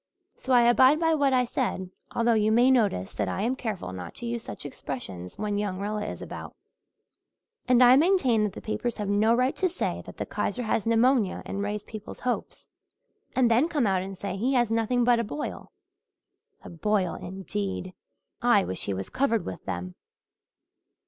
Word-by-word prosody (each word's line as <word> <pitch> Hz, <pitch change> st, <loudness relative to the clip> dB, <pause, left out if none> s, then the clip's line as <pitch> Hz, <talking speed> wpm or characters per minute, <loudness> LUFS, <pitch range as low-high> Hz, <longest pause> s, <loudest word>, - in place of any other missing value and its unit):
So 260 Hz, -, -6 dB
I 245 Hz, -1 st, +6 dB
abide 260 Hz, +5 st, +5 dB
by 325 Hz, -1 st, +3 dB
what 285 Hz, -3 st, +2 dB
I 250 Hz, -1 st, +3 dB
said, 210 Hz, -7 st, -2 dB, 0.2 s
although 235 Hz, 0 st, +3 dB
you 215 Hz, -1 st, +2 dB
may 245 Hz, +4 st, +5 dB
notice 205 Hz, -, +1 dB
that 105 Hz, -, -2 dB
I 190 Hz, -, -2 dB
am 245 Hz, +4 st, 0 dB
careful 215 Hz, -, -4 dB
not 90 Hz, -2 st, -8 dB
to -, -, -7 dB
use 235 Hz, 0 st, -3 dB
such -, -, -8 dB
expressions 110 Hz, -10 st, -7 dB
when 205 Hz, -1 st, -1 dB
young 200 Hz, -3 st, -2 dB
Rilla 210 Hz, +1 st, -2 dB
is -, -, -6 dB
about. -, -, -8 dB, 1.1 s
And 250 Hz, -1 st, +6 dB
I 250 Hz, +1 st, +8 dB
maintain 290 Hz, -, +3 dB
that 205 Hz, -, -3 dB
the -, -, -9 dB
papers 235 Hz, +2 st, -2 dB
have 210 Hz, -, -3 dB
no 215 Hz, +3 st, +3 dB
right 255 Hz, +2 st, +1 dB
to 370 Hz, -, +1 dB
say 360 Hz, -, -3 dB
that -, -, -10 dB
the -, -, -3 dB
Kaiser 245 Hz, -, -2 dB
has 220 Hz, -1 st, -1 dB
pneumonia 230 Hz, -2 st, +2 dB
and 200 Hz, -, -4 dB
raise 205 Hz, 0 st, -3 dB
people's 215 Hz, -1 st, -9 dB
hopes, 250 Hz, -1 st, -3 dB, 0.7 s
and 245 Hz, -3 st, +3 dB
then 255 Hz, +9 st, +3 dB
come 295 Hz, -7 st, +1 dB
out 190 Hz, -2 st, +2 dB
and 190 Hz, 0 st, -7 dB
say 195 Hz, -1 st, -4 dB
he 250 Hz, +7 st, 0 dB
has 240 Hz, -3 st, +2 dB
nothing 230 Hz, +2 st, +1 dB
but 240 Hz, -1 st, +4 dB
a -, -, +1 dB
boil. 295 Hz, +7 st, -6 dB, 0.9 s
A -, -, -9 dB
boil, 185 Hz, +1 st, 0 dB
indeed! 190 Hz, 0 st, -5 dB, 0.5 s
I 240 Hz, -5 st, +4 dB
wish 95 Hz, -, -3 dB
he 100 Hz, -, -2 dB
was 95 Hz, 0 st, -5 dB
covered 230 Hz, -7 st, +1 dB
with 95 Hz, -, -6 dB
them." 90 Hz, -1 st, -4 dB
220 Hz, 190 wpm, -27 LUFS, 195-250 Hz, 1.1 s, I